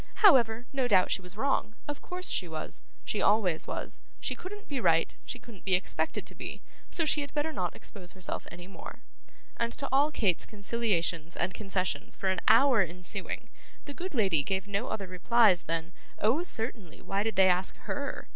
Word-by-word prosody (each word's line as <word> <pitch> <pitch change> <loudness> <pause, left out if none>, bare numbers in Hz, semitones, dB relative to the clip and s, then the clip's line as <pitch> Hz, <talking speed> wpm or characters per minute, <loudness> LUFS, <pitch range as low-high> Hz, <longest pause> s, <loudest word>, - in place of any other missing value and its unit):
However, 240 - +6
no 265 -2 +1
doubt 190 -5 +4
she - - 0
was 180 +2 -6
wrong; 265 -3 +1
of 290 -1 -4
course 365 +1 -3
she 180 - +1
was; 160 -1 -4 0.2
she 210 - -1
always 195 -6 +3
was, - - -4 0.2
she - - -1
couldn't 410 +3 -8
be 280 -3 -2
right, - - +3
she - - -5
couldn't 220 -6 -13
be 190 -2 +4
expected 180 - -1
to - - -7
be; - - -7 0.3
so 330 - 0
she 300 0 +3
had 285 - -4
better 305 +2 0
not 180 - -2
expose 185 -3 -8
herself 185 -1 -4
any 175 0 -9
more; 195 - -10 0.5
and 235 0 0
to 280 - -4
all 285 +3 +4
Kate's 200 - +1
conciliations 200 -7 -1
and 185 - -1
concessions 195 -3 -2
for 190 - 0
an 190 - +1
hour 240 0 +7
ensuing, 180 +2 -4 0.4
the 285 - -6
good 360 +1 -5
lady 190 - +3
gave 190 +4 -1
no 205 +4 -1
other 200 - -3
replies 185 +1 +4
than 165 +1 -2 0.3
Oh, 235 +10 +3
certainly, 225 - -4
why 195 +1 -1
did 220 0 -1
they 190 0 +7
ask 180 +1 +2
HER? 285 -1 -4
205 Hz, 190 wpm, -30 LUFS, 185-265 Hz, 0.5 s, hour